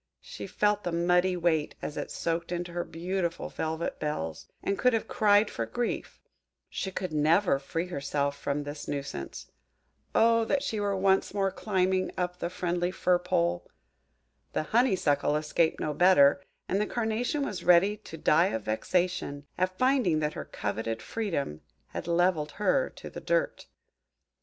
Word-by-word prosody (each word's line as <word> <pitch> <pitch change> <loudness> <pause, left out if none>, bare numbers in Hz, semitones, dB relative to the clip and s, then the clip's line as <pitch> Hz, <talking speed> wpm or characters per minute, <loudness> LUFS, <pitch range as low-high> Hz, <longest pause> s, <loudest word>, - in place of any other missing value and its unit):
She - - -8
felt 210 0 +1
the 175 - -2
muddy 180 +2 +2
weight 165 -3 +1
as 150 - -5
it - - -4
soaked 165 +1 -2
into 175 0 -3
her 175 0 -1
beautiful 170 +1 -3
velvet 160 +1 -3
bells, 80 - -3 0.2
and 200 - 0
could 250 -1 +4
have 225 - 0
cried 205 0 +4
for 115 -1 -3
grief: 240 - -3 0.5
she 190 - -3
could 185 -3 -4
never 155 +1 +3
free 165 +5 -3
herself 140 -4 -2
from 140 +1 -2
this 145 +1 -7
nuisance. 140 - -5 0.6
O 230 0 +5
that 275 +4 0
she 220 - -2
were 200 -1 0
once 190 +1 +2
more 195 -1 +1
climbing 185 -2 0
up 180 0 -2
the 170 - -2
friendly 175 -1 -1
fir 180 -1 +2
pole! 85 - 0 0.8
The - - 0
Honeysuckle 185 - +3
escaped 155 +2 +1
no 150 - -1
better; 145 -5 +5 0.3
and 195 +2 +1
the 210 - 0
Carnation 240 +5 -1
was 185 -7 -5
ready 180 +4 +5
to 180 -6 -10
die 165 +3 +4
of 115 - -3
vexation, 145 - -1
at 185 0 -1
finding 255 - +3
that 150 0 -1
her - - -6
coveted 110 +2 -3
freedom 165 - -3 0.3
had - - -6
levelled 170 -3 +1
her - - +1
to - - -9
the - - -7
dirt. - - 0
175 Hz, 160 wpm, -29 LUFS, 150-195 Hz, 0.8 s, O